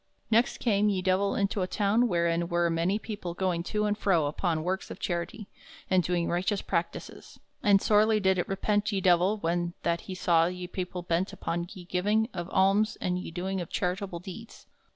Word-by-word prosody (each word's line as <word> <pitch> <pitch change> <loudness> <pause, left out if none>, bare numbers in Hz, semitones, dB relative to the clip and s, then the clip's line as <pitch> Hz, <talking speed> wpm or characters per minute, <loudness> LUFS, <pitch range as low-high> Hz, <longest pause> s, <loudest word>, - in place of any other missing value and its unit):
Next 230 +2 +3
came 210 -3 +2
ye 190 -2 -1
Divell 190 +2 +2
into 200 0 0
a 185 - 0
town 210 +5 +2
wherein 170 -3 +1
were 170 -1 +1
many 170 +5 +1
people 205 -6 -6
going 180 -2 0
to 210 +2 -1
and 210 0 +1
fro 190 -7 +2
upon 155 +2 -1
works 185 +2 -2
of - - -7
charity, 175 +4 -3 0.4
and 185 -1 +5
doing 175 0 0
righteous 190 +3 0
practices; 170 -2 -4 0.2
and 200 -1 +5
sorely 215 +1 +3
did 190 -2 +2
it - - -1
repent 205 +2 0
ye 200 - 0
Divell 185 +3 +3
when 175 -1 -1
that 170 0 0
he 185 - -4
saw 170 -2 +3
ye 180 0 -5
people 180 0 -5
bent 175 +2 -1
upon 170 +1 -3
ye 185 -3 -10
giving 210 +6 +1
of 175 0 -5
alms 200 +4 +3
and 180 0 -1
ye - - -6
doing 185 +3 -3
of 170 - -6
charitable 180 0 -2
deeds. 215 +5 -10
185 Hz, 195 wpm, -28 LUFS, 175-205 Hz, 0.4 s, and